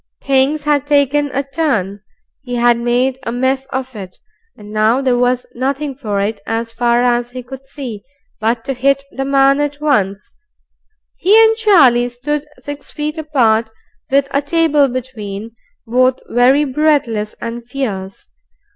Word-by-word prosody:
Things 275 +2 +2
had 290 -1 +1
taken 290 0 +2
a 275 +2 -1
turn. 260 - -1 0.4
He 245 -2 -5
had 240 0 +3
made 250 +2 0
a 235 - -4
mess 260 +2 -1
of 260 -1 -5
it, 190 -3 -9 0.4
and 210 0 -12
now 215 +4 +2
there 260 -2 +1
was 245 0 +1
nothing 275 +3 -2
for 215 -7 -3
it, 205 +1 -2
so 225 +1 -1
far 235 +1 +1
as 240 -1 +1
he 250 0 -8
could 265 +2 -11
see, 245 -9 -7 0.4
but 230 +2 -1
to 270 - -2
hit 275 +2 +1
the 270 - -4
man 275 0 +3
at 290 0 -2
once. 210 -9 0 0.8
He 405 +4 +4
and 445 0 +4
Charlie 280 - +4
stood 290 +5 -4
six 290 -1 -8
feet 300 +2 -4
apart, 235 -8 +1 0.4
with 275 0 +2
a 280 +1 +1
table 300 -1 +2
between, 230 -5 -6 0.3
both 255 +2 +2
very 255 +5 +4
breathless 265 -7 0
and 235 +1 -5
fierce. 215 -7 -5
260 Hz, 155 wpm, -16 LUFS, 235-280 Hz, 0.8 s, He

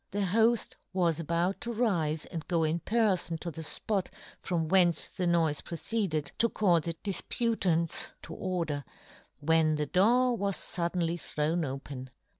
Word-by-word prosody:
The 205 - -2
hoft 225 +4 +2 0.2
was 170 -3 +1
about 170 +4 0
to 235 - -3
rife 175 -10 0
and 165 -3 -5
go 170 -3 +1
in 160 +2 +1
per 220 +1 +2
fon 170 -2 -3
to 170 +1 -5
the 160 - -7
fpot 195 +4 0 0.3
from 165 -3 -1
whence 175 -1 +5
the 180 -2 -3
noife 165 -4 +2
proceeded, 170 -4 -1
to 230 - +4
call 180 -7 +3
the 165 +1 -4
difputants 190 -5 0
to - - -8
order, 165 -6 -2 0.6
when 160 0 +3
the 150 0 -1
door 240 - +3
was 200 -3 0
fuddenly 170 -1 -1
thrown 160 +3 -1
open. 135 -1 -6
170 Hz, 155 wpm, -30 LUFS, 160-195 Hz, 0.6 s, whence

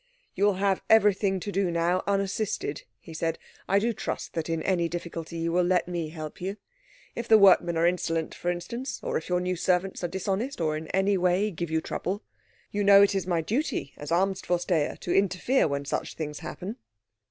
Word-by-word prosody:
"You 200 - +1
will 205 -2 +3
have 195 0 +1
everything 200 -3 +4
to 205 - -4
do 195 -2 +1
now 170 +2 +1
unassisted," 195 -6 -1
he 165 - -12
said. 165 0 -1 0.3
"I 195 - +4
do 230 +3 +1
trust - - -4
that 165 0 -3
in 165 -1 -1
any 175 -3 +1
difficulty 170 -1 -5
you 165 0 -1
will 180 +2 +3
let 175 -1 +2
me 170 -3 -3
help 155 0 -8
you. 195 +3 -3 0.6
If 235 0 -5
the 220 - +8
workmen 180 -4 +5
are 165 - +3
insolent, 165 -2 0
for 175 - -3
instance, 230 +10 -4
or - - -2
if 470 - -3
your 180 0 +2
new 180 0 -1
servants 180 +2 0
are - - +1
dishonest 195 +8 -2
or 155 -2 0
in 155 +1 -5
any 195 +2 +1
way 180 +4 +2
give 170 -1 -4
you 160 0 0
trouble. 195 +6 -3 0.5
You 205 0 -1
know 200 0 +8
it 200 - +3
is 190 -2 -2
my 170 -2 +1
duty 220 - -2
as 145 - -8
Amtsvorsteher 175 -3 0
to 175 - -1
interfere 195 +6 +2
when 140 -1 -2
such 140 - -3
things 150 -2 -5
happen." 195 +5 -6
180 Hz, 200 wpm, -27 LUFS, 165-200 Hz, 0.6 s, the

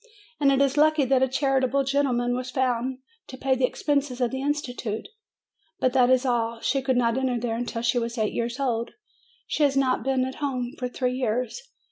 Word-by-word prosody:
And 280 -1 +4
it 270 - +2
is 275 +1 0
lucky 305 -1 +4
that 260 0 +3
a 265 - +4
charitable 270 0 +1
gentleman 260 -3 +1
was 255 0 -4
found 255 0 -1 0.3
to 260 - -9
pay 265 0 +1
the 260 0 +2
expenses 280 -3 -1
of 245 -2 +1
the 265 0 -3
institution. 250 -6 -2 0.8
But 255 - +1
that 255 -2 +4
is 260 +1 +3
all 230 -2 0
she 275 +3 0
could 260 -1 +1
not 235 +1 +2
enter 255 -2 0
there 230 -1 -2
until 235 0 -3
she 240 +1 +2
was 235 +1 -4
eight 215 -1 0
years 235 +2 -2
old. 235 -4 -1 0.5
She - - -3
has 280 -2 +3
not 260 -2 +2
been 265 -1 +1
at 260 - -6
home 255 -3 -2
for 250 - -2
three 250 0 -1
years. 250 - -2
255 Hz, 205 wpm, -25 LUFS, 245-270 Hz, 0.8 s, And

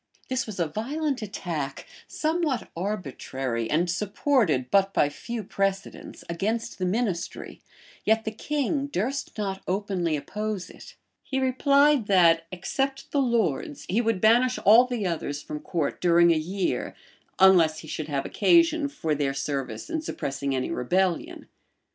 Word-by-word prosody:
[*] - - -35
This 260 -2 -1
was 210 -4 -7
a 170 - +2
violent 265 - -2
attack, 170 -9 -4 0.2
somewhat 310 -5 -1
arbitrary, 135 - -3
and 170 +4 +2
supported 180 - +1
but 195 0 +3
by 145 - +3
few 230 +9 -6
precedents, 195 0 -3
against 220 +8 -2
the 185 - 0
ministry; 195 -3 -3 0.4
yet 220 +1 +2
the 220 - -2
king 285 +4 -1
durst 270 +3 -3
not 195 -2 -3
openly 185 -4 -1
oppose 210 +4 -4
it: - - -14 0.3
he 265 - -3
replied 280 -1 +3
that, 165 -4 +4
except 270 +9 -3
the 285 - +2
lords, 235 - 0
he 215 +6 +2
would 225 -4 0
banish 240 +5 +4
all 225 +5 +8
the 240 -5 -2
others 150 -4 -3
from 150 - -6
court 160 -1 -3
during 170 -1 +5
a - - +4
year, 180 +5 -2 0.4
unless 170 -5 +5
he 155 - -12
should 155 0 -4
have 140 -3 -2
occasion 325 - +3
for 160 - -2
their 140 -2 -1
service 135 -5 -3
in 320 - -2
suppressing 140 - -3
any 130 - -2
rebellion. 180 +7 -1
195 Hz, 150 wpm, -26 LUFS, 165-245 Hz, 0.4 s, all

